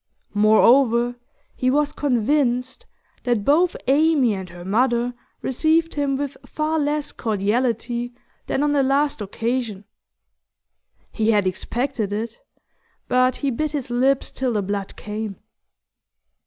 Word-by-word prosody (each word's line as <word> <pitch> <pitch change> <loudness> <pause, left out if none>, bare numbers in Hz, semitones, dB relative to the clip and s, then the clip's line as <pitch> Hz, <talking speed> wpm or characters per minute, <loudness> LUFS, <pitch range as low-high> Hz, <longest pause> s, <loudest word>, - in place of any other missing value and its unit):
Moreover, 235 +3 +4 0.4
he 255 - +1
was 290 +2 +2
convinced 260 -2 0 0.3
that 240 -5 0
both 335 +5 +3
Amy 285 -4 +3
and 190 -2 -6
her 175 0 -11
mother 240 +4 +1 0.3
received 320 +5 +1
him 280 -2 0
with 285 0 -4
far 310 +1 -1
less 295 0 -1
cordiality 235 +3 -1 0.4
than 275 - 0
on 295 - +2
the 285 - +3
last 275 -1 +1
occasion. 225 0 -3 1.3
He 220 -1 0
had 205 -3 +3
expected 225 +4 -2
it, 220 +2 -4 0.7
but 255 0 +3
he 280 -2 -1
bit 305 +5 -2
his 270 -4 -3
lips 260 +2 +2
till 255 -2 -1
the 210 -2 0
blood 200 0 -4
came. 210 -1 -5
245 Hz, 125 wpm, -22 LUFS, 220-280 Hz, 1.3 s, Moreover